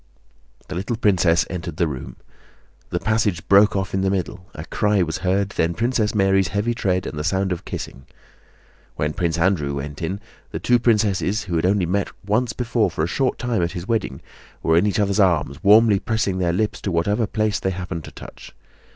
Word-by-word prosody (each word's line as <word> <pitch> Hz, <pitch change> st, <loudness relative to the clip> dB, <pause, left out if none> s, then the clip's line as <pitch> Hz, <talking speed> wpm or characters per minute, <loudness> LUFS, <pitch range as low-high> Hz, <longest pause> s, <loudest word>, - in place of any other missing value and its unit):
The -, -, -6 dB
little 100 Hz, +6 st, -2 dB
princess 95 Hz, -5 st, +3 dB
entered 85 Hz, -3 st, -6 dB
the 85 Hz, -, +2 dB
room. 70 Hz, -4 st, -6 dB, 0.7 s
The -, -, -1 dB
passage 110 Hz, -6 st, 0 dB
broke 100 Hz, +2 st, +5 dB
off 95 Hz, -1 st, -2 dB
in 95 Hz, -, +1 dB
the 95 Hz, -, +1 dB
middle, 95 Hz, -1 st, -3 dB
a 75 Hz, -, -7 dB
cry 105 Hz, -2 st, +1 dB
was 80 Hz, -2 st, -3 dB
heard, 95 Hz, +1 st, 0 dB
then 85 Hz, -3 st, -1 dB
Princess 115 Hz, -2 st, 0 dB
Mary's 95 Hz, -2 st, +3 dB
heavy 105 Hz, +6 st, -1 dB
tread 95 Hz, -5 st, -1 dB
and 75 Hz, -, -5 dB
the -, -, -2 dB
sound 95 Hz, +3 st, 0 dB
of 90 Hz, -, -4 dB
kissing. 65 Hz, 0 st, -7 dB, 0.9 s
When 75 Hz, 0 st, -1 dB
Prince 85 Hz, -2 st, -1 dB
Andrew 85 Hz, -5 st, +1 dB
went 70 Hz, +2 st, -6 dB
in 95 Hz, +4 st, -3 dB, 0.3 s
the -, -, -5 dB
two 120 Hz, -1 st, +2 dB
princesses, 105 Hz, -3 st, +1 dB
who 90 Hz, -3 st, -4 dB
had 80 Hz, +2 st, +2 dB
only 95 Hz, -1 st, +2 dB
met 100 Hz, +3 st, -1 dB, 0.2 s
once 110 Hz, +4 st, +1 dB
before 120 Hz, -4 st, 0 dB
for 80 Hz, -, -2 dB
a -, -, +1 dB
short 130 Hz, +8 st, 0 dB
time 120 Hz, -6 st, -1 dB
at 85 Hz, -, -1 dB
his 90 Hz, +2 st, -6 dB
wedding, 110 Hz, -, -1 dB, 0.4 s
were 80 Hz, -, +3 dB
in 85 Hz, +5 st, +4 dB
each 100 Hz, -, 0 dB
other's 100 Hz, 0 st, +1 dB
arms 80 Hz, -8 st, +1 dB
warmly 105 Hz, 0 st, +6 dB
pressing 110 Hz, -4 st, -1 dB
their 85 Hz, -2 st, +1 dB
lips 105 Hz, +4 st, -1 dB
to 100 Hz, -, -2 dB
whatever 100 Hz, +7 st, +1 dB
place 110 Hz, -1 st, 0 dB
they 95 Hz, -, -1 dB
happened 90 Hz, -2 st, -5 dB
to -, -, -10 dB
touch. -, -, -12 dB
95 Hz, 205 wpm, -22 LUFS, 85-105 Hz, 0.9 s, warmly